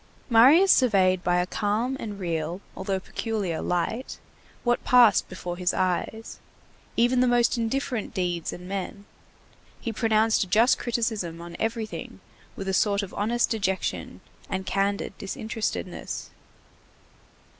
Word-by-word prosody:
Marius 285 +12 +7
surveyed 190 -7 +4
by 175 - +2
a 180 0 +2
calm 215 +7 -1
and 210 -3 -5
real, 170 -1 -3 0.2
although 195 -2 -2
peculiar 195 -4 -3
light, 200 +8 -2 0.5
what 240 -1 +1
passed 240 -6 +5
before 180 -1 -6
his 180 0 0
eyes, 185 +5 -2 0.6
even 245 +2 +3
the 255 - +4
most 240 -1 +3
indifferent 235 0 -2
deeds 175 -3 -2
and 180 +1 -9
men; 200 +1 -5 0.7
he 230 - -4
pronounced 220 0 +2
a - - -7
just 220 +7 +4
criticism 220 -8 -2
on 170 0 -9
everything 220 - -4 0.4
with 195 - -6
a 190 - 0
sort 200 +1 +2
of 195 - -8
honest 235 +4 0
dejection 195 -4 -2 0.3
and 190 0 -3
candid 200 +1 -1
disinterestedness. 220 +3 -4
205 Hz, 130 wpm, -26 LUFS, 185-230 Hz, 0.7 s, Marius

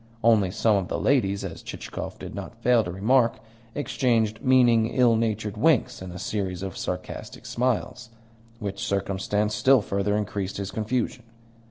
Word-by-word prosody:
Only 110 -4 +4
some 105 +3 +2
of 95 -2 -2
the - - -2
ladies 100 -8 +1
(as 85 -3 -7
Chichikov - - -7
did - - -8
not - - -7
fail 120 -2 +4
to 90 - -5
remark) 115 +6 +2 0.4
exchanged 115 -6 +1
meaning, 120 -4 +4
ill 120 -1 +3
natured 110 -2 -1
winks 155 -12 +2
and 95 -1 -7
a 90 - -7
series 95 -1 -3
of 95 -2 -5
sarcastic - - -6
smiles: 125 0 -1 0.5
which 100 -3 -5
circumstance 100 +2 -1
still 120 +2 +4
further 100 +1 0
increased 100 -2 -3
his 100 0 -4
confusion. 120 +3 -2
105 Hz, 155 wpm, -25 LUFS, 100-120 Hz, 0.5 s, Only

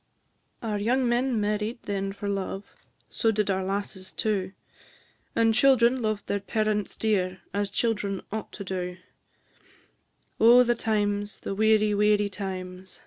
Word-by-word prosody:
Our 210 -2 -1
young 250 +5 +1
men 240 0 +1
married 210 +3 -2
then 195 -1 -2
for 200 +1 -6
love, 195 0 -3 0.4
So 225 - 0
did 210 -2 +1
our 190 0 0
lasses 190 -1 -4
too; 195 -3 -1 0.8
And 225 -1 +4
children 255 0 +4
loved 215 -2 -1
their 200 - -1
parents 210 +1 -1
dear, 190 -4 0
As 200 0 0
children 205 -3 -1
ought 220 +1 -4
to 200 - -6
do: 180 -1 -4 1.4
Oh, 240 +2 +8
the 240 0 +2
times, 205 -2 -1
the - - -4
weary, 215 0 +3
weary 210 0 +3
times! 185 -2 -7
205 Hz, 140 wpm, -27 LUFS, 195-220 Hz, 1.4 s, Oh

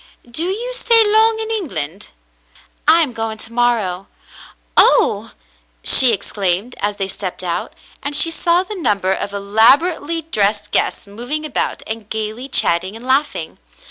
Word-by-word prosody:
"Do 275 +8 -3
you 455 +7 -3
stay 460 -2 +3
long 440 +1 +3
in 445 0 -4
England?" 195 - -4 0.8
"I 325 +2 +6
am 285 -6 0
going 225 -1 -4
to 225 +2 -6
morrow. 220 -6 0 0.7
Oh - - +3 0.3
!" - - -39
she 255 -2 +8
exclaimed, 200 +1 -2
as 205 0 -2
they 195 -1 -3
stepped 185 -1 -6
out, 170 -2 -4 0.3
and 285 +1 -2
she 330 - +5
saw 340 +2 +1
the 425 - -8
number 200 - 0
of 200 +1 -5
elaborately 280 - +2
dressed 210 -9 -1
guests - - 0
moving 245 +10 -5
about 300 - -3
and 220 -1 -6
gayly 220 +4 -5
chatting 185 -4 +2
and 230 +2 -11
laughing. 265 - -1
230 Hz, 150 wpm, -17 LUFS, 200-325 Hz, 0.8 s, she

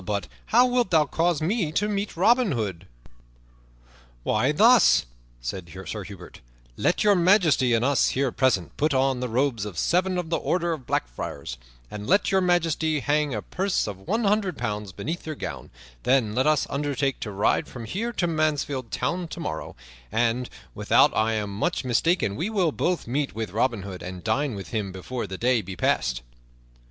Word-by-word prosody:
But 100 -1 -2 0.2
how 245 +3 +5
wilt 245 -4 +1
thou 155 -3 +4
cause 165 +2 0
me 180 -2 0
to 205 +5 +1
meet 205 -3 -3
Robin 235 - +4
Hood?" 95 -7 -4 1.4
"Why, 125 +6 +2
thus," 215 - +5 0.4
said 85 +8 -5 0.2
Sir 105 -2 -5
Hubert, 100 -1 -11 0.3
"let - - +1
Your 205 -1 +5
Majesty 170 - +4
and 115 +2 +1
us 140 0 +3
here 135 -1 0
present 120 -11 +1
put 150 -1 +1
on 130 -1 +2
the 125 0 -3
robes 120 -2 0
of 105 -5 -6
seven 180 - +1
of 175 -2 -4
the 165 - +2
Order 175 -1 0
of 140 -6 -8
Black - - 0
Friars, - - -6 0.3
and 105 0 -6
let 200 +1 +3
Your 190 0 +3
Majesty 165 -4 +1
hang 145 -1 +1
a 105 - -4
purse 195 +1 -1
of 100 -3 -6
one 230 - 0
hundred 200 -4 +1
pounds 105 -1 -3
beneath 160 - -5
your 155 - -3
gown; - - -6 0.3
then 125 - +2
let 130 +5 +1
us 155 -2 +3
undertake 140 -1 -1
to 110 - -5
ride 100 0 +1
from 120 -3 -8
here 210 - -3
to 190 - -1
Mansfield 150 -6 -1
Town 175 +8 -2
tomorrow, 150 - -5 0.4
and, 120 +3 0 0.2
without - - +3
I 110 +1 +2
am 105 -2 -2
much 170 - -1
mistaken, 125 - +1
we 170 - -2
will 190 -7 +1
both 175 +4 -1
meet 135 +2 -2
with 110 -4 -4
Robin 115 -1 0
Hood 95 -2 -7
and 90 0 -7
dine 125 +3 0
with 95 -5 -7
him 105 -2 -2
before 105 +5 -5
the 95 0 -6
day 120 +1 +2
be 95 -1 -8
passed." - - 0
135 Hz, 185 wpm, -25 LUFS, 105-175 Hz, 1.4 s, how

